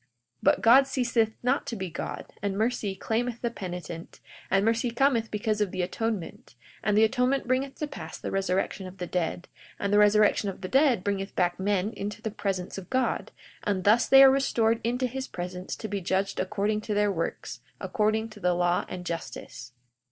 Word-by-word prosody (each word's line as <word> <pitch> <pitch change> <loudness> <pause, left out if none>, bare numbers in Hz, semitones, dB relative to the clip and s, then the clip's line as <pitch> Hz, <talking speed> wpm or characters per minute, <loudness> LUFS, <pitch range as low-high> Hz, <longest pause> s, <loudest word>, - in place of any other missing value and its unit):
42:23 125 - -41 0.3
But - - +3
God 265 +4 +7
ceaseth 240 -4 +1
not 255 +3 +1
to 235 - -3
be 190 -4 -5
God, - - -6
and 200 -1 -2
mercy 220 -3 0
claimeth 235 +4 -2
the 235 - 0
penitent, 175 -5 -7 0.3
and 195 +1 +3
mercy 230 +2 +2
cometh 235 -2 +2
because 210 0 -1
of 205 - +2
the 185 0 -2
atonement; 200 - -4 0.3
and 210 0 +2
the 220 - +6
atonement 250 +3 +1
bringeth 260 +2 0
to 300 - -3
pass 165 - -8
the - - -5
resurrection 195 0 -1
of 185 +1 -11
the 180 - -4
dead; 175 0 -2 0.3
and 200 0 -1
the 205 - +6
resurrection 210 0 +4
of 190 - -8
the 185 - -4
dead 260 -5 +3
bringeth 195 -1 -2
back 175 -1 +1
men 200 +2 0
into 205 +1 -5
the 220 - -4
presence 195 -3 -3
of 185 - -12
God; 260 -1 0 0.3
and 195 -3 -1
thus 215 +4 +4
they 270 0 +9
are 270 - +9
restored 230 -4 +2
into 245 +3 0
his 260 +2 -4
presence, 180 +1 -5
to 220 - -6
be 200 -1 -3
judged 190 +2 -1
according 210 +2 0
to 210 -1 -3
their 205 0 +3
works, 165 -3 -4 0.2
according 220 -1 0
to 215 -1 -13
the 180 -2 +1
law 175 0 +1
and 180 -1 -6
justice. 125 -7 -6
210 Hz, 195 wpm, -27 LUFS, 185-235 Hz, 0.3 s, they